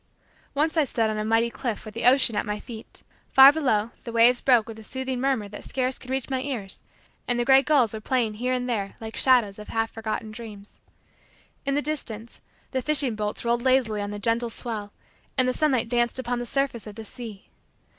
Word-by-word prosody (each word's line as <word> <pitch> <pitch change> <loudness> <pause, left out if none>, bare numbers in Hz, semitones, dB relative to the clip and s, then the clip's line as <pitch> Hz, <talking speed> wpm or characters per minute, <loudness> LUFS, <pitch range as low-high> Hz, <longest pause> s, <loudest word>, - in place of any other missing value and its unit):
Once 315 +3 +1
I 315 - +5
stood 230 -5 0
on 215 - -3
a - - -1
mighty 225 +2 +2
cliff 235 -4 -4
with 215 - -8
the 230 - -3
ocean 250 -3 +5
at - - +1
my 210 0 -3
feet. 225 -1 -10 0.3
Ear 270 +1 +11
below, 235 -8 0
the 235 - -6
waves 235 +2 +4
broke 245 -5 +4
with 225 -1 -8
a - - -11
soothing 260 +2 -3
murmur 260 -6 0
that 205 - -9
scarce 260 0 -1
could 255 - -13
reach 265 -1 -2
my 260 -1 -1
ears 245 -8 -4 0.5
and 245 - +1
the 240 - +1
gray 265 +1 +7
gulls 275 -7 +3
were 220 - -5
playing 235 -2 0
here 245 +4 -2
and 250 -1 -1
there 205 -5 -2
like 220 0 -7
shadows 235 -6 +3
of 210 - -9
half 225 0 -1
forgotten 220 0 -4
dreams. 215 -3 -10 0.9
In 275 - +1
the 290 - 0
distance, 235 -7 -5 0.3
the 260 - -1
fishing 285 -4 +2
boats 210 +1 -3
rolled 235 0 +1
lazily 250 -5 +2
on 205 - -3
the 205 - -5
gentle 230 +3 +1
swell 220 -3 -5 0.5
and 255 -1 +4
the 255 - +1
sunlight 265 -7 +1
danced 240 0 +1
upon 245 -1 -2
the 240 - -5
surface 275 -5 -1
of 210 - -9
the 225 0 -8
sea. 215 -3 -10
235 Hz, 215 wpm, -25 LUFS, 220-260 Hz, 0.9 s, Ear